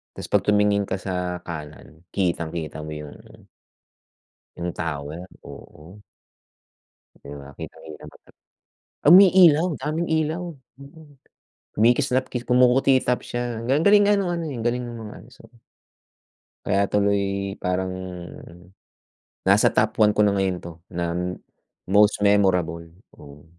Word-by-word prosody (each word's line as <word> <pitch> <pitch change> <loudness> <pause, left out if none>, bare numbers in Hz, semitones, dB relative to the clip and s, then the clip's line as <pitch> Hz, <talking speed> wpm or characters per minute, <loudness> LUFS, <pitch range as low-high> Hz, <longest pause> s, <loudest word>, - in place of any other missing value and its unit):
'Tas - - -7
'pag - - +2
tumingin 105 -1 +2
ka 95 - -1
sa 90 -2 -4
kanan, 80 0 -10
kitang-kita 85 -4 -2
mo 75 - -7
'yun, 75 -1 -9
oo. - - -19 1.1
'Yung 85 0 -4
tower, 80 +2 -5 0.2
oo. 85 +7 -13 1.2
'Di 70 - -9
ba 70 - -12
kitang-kita 80 -1 -10
mo - - -14
talaga. - - -25 0.7
Umiilaw, 180 -4 +7 0.2
daming 155 +4 -2
ilaw, 160 +2 -1 0.4
mm. 145 +1 -15 0.7
Kumikislapkis 125 +2 +1
kumukutitap 125 0 +3
siya. 120 -2 -4
Galing 135 +2 +2
ang 160 - -1
galing 205 0 +6
nga - - +5
ng 195 -3 -1
ano 170 -1 -3
eh, 135 - -6
ang 115 - -6
galing 125 +1 0
ng 120 -1 -7
mga 110 -2 -9
ano, 115 - -17
so 125 - -18 1.2
Kaya 100 0 +1
tuloy 100 -1 0
parang, 95 +1 -1 1.5
nasa 100 +2 +5
top 110 +1 +1
1 105 -1 +4
ko 105 - 0
na 105 -1 +3
ngayon 95 -2 0
'to 85 - -8 0.2
na 85 - -2 0.9
most 105 +1 +4
memorable, 90 -5 +2 0.3
oo. 70 0 -14
105 Hz, 130 wpm, -23 LUFS, 90-125 Hz, 1.5 s, Umiilaw